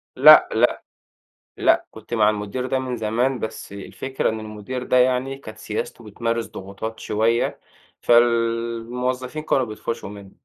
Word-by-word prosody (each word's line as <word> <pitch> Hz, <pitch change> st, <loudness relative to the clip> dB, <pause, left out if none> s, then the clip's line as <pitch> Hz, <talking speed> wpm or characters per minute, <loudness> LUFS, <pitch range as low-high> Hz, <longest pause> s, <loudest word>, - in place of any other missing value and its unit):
لأ، 150 Hz, +4 st, +9 dB
لأ، 120 Hz, +2 st, +2 dB, 0.7 s
لأ، -, -, +3 dB
كنت 110 Hz, +2 st, -10 dB
مع 105 Hz, -2 st, +4 dB
المدير 105 Hz, +4 st, -3 dB
ده 130 Hz, +1 st, 0 dB
من 130 Hz, -2 st, -3 dB
زمان، 120 Hz, +4 st, 0 dB
بس 110 Hz, -2 st, -6 dB
الفكرة 130 Hz, +6 st, -3 dB
إن 110 Hz, 0 st, -3 dB
المدير 110 Hz, +4 st, -6 dB
ده 125 Hz, -, +2 dB
يعني 130 Hz, +1 st, +2 dB
كانت 110 Hz, -6 st, -11 dB
سياسته 110 Hz, +2 st, -5 dB
بتمارس 115 Hz, +2 st, -2 dB
ضغوطات 100 Hz, +2 st, -7 dB
شوية، 115 Hz, +3 st, 0 dB, 0.4 s
فالموظفين 120 Hz, +3 st, +1 dB
كانوا 135 Hz, -4 st, +1 dB
بيطفشّوا 110 Hz, -1 st, -5 dB
منه. 100 Hz, -1 st, -11 dB
115 Hz, 140 wpm, -22 LUFS, 110-125 Hz, 0.7 s, لأ